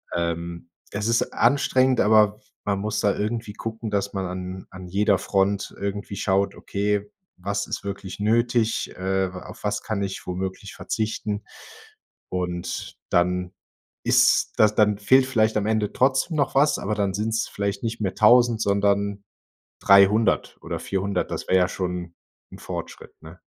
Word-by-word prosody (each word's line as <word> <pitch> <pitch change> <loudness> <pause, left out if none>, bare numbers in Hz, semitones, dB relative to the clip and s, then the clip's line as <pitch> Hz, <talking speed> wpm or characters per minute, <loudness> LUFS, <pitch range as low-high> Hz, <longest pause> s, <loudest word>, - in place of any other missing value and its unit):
Ähm, 85 0 -3 0.2
es 105 +1 -2
ist 115 0 +1
anstrengend, 130 0 +3
aber 105 -1 +4 0.3
man 100 -1 0
muss 105 +2 -2
da 100 - +2
irgendwie 110 0 -3
gucken, 110 +1 -5
dass 100 -1 -1
man 95 -1 -2
an 90 +1 -6
an 95 -1 -9
jeder 100 +2 +2
Front 100 +1 0
irgendwie 100 0 -4
schaut: 100 0 +1
„Okay, 105 0 -2 0.3
was 100 +3 -2
ist - - -4
wirklich 100 -1 -6
nötig, 115 +1 +1
äh, 95 0 -1
wa 90 - -8
auf - - -12
was 105 0 -1
kann 105 -3 -2
ich 95 -1 -5
womöglich 95 +2 -4
verzichten.“ 105 -1 -3 0.9
Und 90 -1 -4
dann 90 +1 +1 0.5
ist - - +4
das 105 0 +5
dann 105 -1 +3
fehlt 130 +5 +5
vielleicht 110 -4 +1
am 105 - 0
Ende 110 -2 0
trotzdem 135 +5 +2
noch 145 - +1
was, 145 +2 +4
aber 105 +1 -2
dann 100 -2 0
sind's 110 +3 -1
vielleicht 100 -1 -3
nicht 115 -1 -3
mehr 95 -3 -1
1.000, 120 0 +5
sondern 100 0 +1 0.6
300 100 +3 +4
oder - - -4
400, 100 +1 -2
das - - -4
wäre 95 - +4
ja 90 0 +3
schon 90 -1 -4 0.4
'n - - -10
Fortschritt, - - -7
ne? - - -12
100 Hz, 155 wpm, -24 LUFS, 95-110 Hz, 0.9 s, das